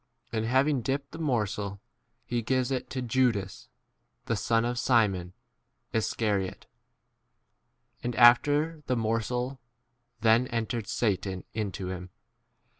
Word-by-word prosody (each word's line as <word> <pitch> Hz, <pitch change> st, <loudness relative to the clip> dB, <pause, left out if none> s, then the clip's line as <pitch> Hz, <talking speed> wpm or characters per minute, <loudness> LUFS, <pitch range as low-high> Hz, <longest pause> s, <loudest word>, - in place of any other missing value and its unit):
And 110 Hz, -1 st, 0 dB
hav 130 Hz, +4 st, +3 dB
ing 145 Hz, -4 st, +1 dB
dipped 140 Hz, +4 st, -2 dB
the 160 Hz, -, -8 dB
morsel, 105 Hz, -8 st, -1 dB, 0.5 s
he 120 Hz, -1 st, -1 dB
gives 130 Hz, +2 st, 0 dB
it 130 Hz, -, -2 dB
to 130 Hz, -1 st, -3 dB
Judas 115 Hz, -6 st, 0 dB, 0.6 s
[the 115 Hz, -, 0 dB
son] 115 Hz, +3 st, +1 dB
of 120 Hz, 0 st, -1 dB
Simon, 100 Hz, -9 st, +2 dB, 0.6 s
Is 110 Hz, -1 st, +1 dB
27 115 Hz, -, -2 dB, 0.3 s
cariote. -, -, -22 dB, 1.4 s
And, 120 Hz, -1 st, -3 dB
after 145 Hz, +7 st, +5 dB
the 125 Hz, -, +1 dB
morsel, 120 Hz, +3 st, -1 dB, 0.6 s
then 115 Hz, +3 st, +4 dB
entered 115 Hz, -2 st, -2 dB
Satan 100 Hz, -5 st, -1 dB
into 100 Hz, -3 st, -3 dB
him. 90 Hz, 0 st, -6 dB
115 Hz, 125 wpm, -28 LUFS, 105-130 Hz, 1.4 s, after